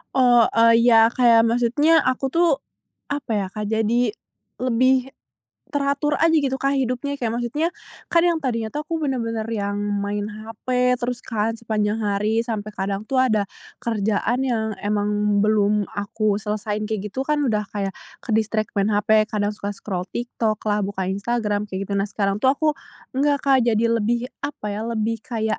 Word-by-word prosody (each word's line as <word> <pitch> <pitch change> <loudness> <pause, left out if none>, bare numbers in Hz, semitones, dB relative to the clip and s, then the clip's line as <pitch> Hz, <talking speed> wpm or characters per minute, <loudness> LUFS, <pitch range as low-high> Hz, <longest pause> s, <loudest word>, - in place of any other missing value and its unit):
Oh, 245 -2 +6
eee, 230 0 +5
iya 225 -2 +7
kayak 230 -1 +4
maksudnya 250 +8 +3
aku 255 +1 0
tuh 335 +6 +2 0.6
apa 285 -4 -4
ya, 205 -3 +1
Kak, 210 +3 -6
jadi 225 +1 +2 0.5
lebih 255 +1 +2 0.6
teratur 285 +1 0
aja 325 0 +4
gitu, 270 -3 +1
Kak, 275 +1 +1
hidupnya. 265 +2 -1
Kayak 230 -3 -1
maksudnya, 270 +7 -1 0.4
kan 335 -1 +4
yang 340 -2 +2
tadinya 230 -4 -1
tuh 300 - -2
aku 330 -1 -3
bener-bener 230 -4 -2
yang 205 -2 -2
main 205 0 -2
HP 215 +1 -10 0.3
terus 245 -1 -3
kan 225 0 -1
sepanjang 220 -1 -1
hari, 210 +2 +1
sampai 215 -3 -4
kadang 195 +1 -2
tuh 265 +3 0
ada 215 -5 +2 0.4
kerjaan 225 +3 0
yang 220 -3 -1
emang 210 0 +1
belum 210 -1 +2
aku 205 0 -1
selesaiin 210 0 -2
kayak 210 -2 -2
gitu 265 +5 -2
kan, 300 0 +1
udah 210 -2 +1
kayak 195 -2 -3 0.3
ke-distract 220 -1 0
main 200 +1 +1
HP, 215 +1 +3
kadang 210 0 -1
suka 205 0 -4
scroll 185 -3 -4
TikTok 230 -3 -2
lah, 210 -1 +1
buka 190 -2 -3
Instagram, 205 +1 -1
kayak 190 +1 -3
gitu. - - -5
Nah, 195 - 0
sekarang 200 -1 -1
tuh 260 - +5
aku 310 +2 0 0.5
enggak, 285 +1 +1
Kak, 270 -1 +5
jadi 230 -1 +2
lebih 230 +2 +1 0.2
apa 280 -7 -4
ya, 210 - -4
lebih 230 0 -1
kayak, 220 -3 -2
225 Hz, 165 wpm, -22 LUFS, 210-250 Hz, 0.6 s, iya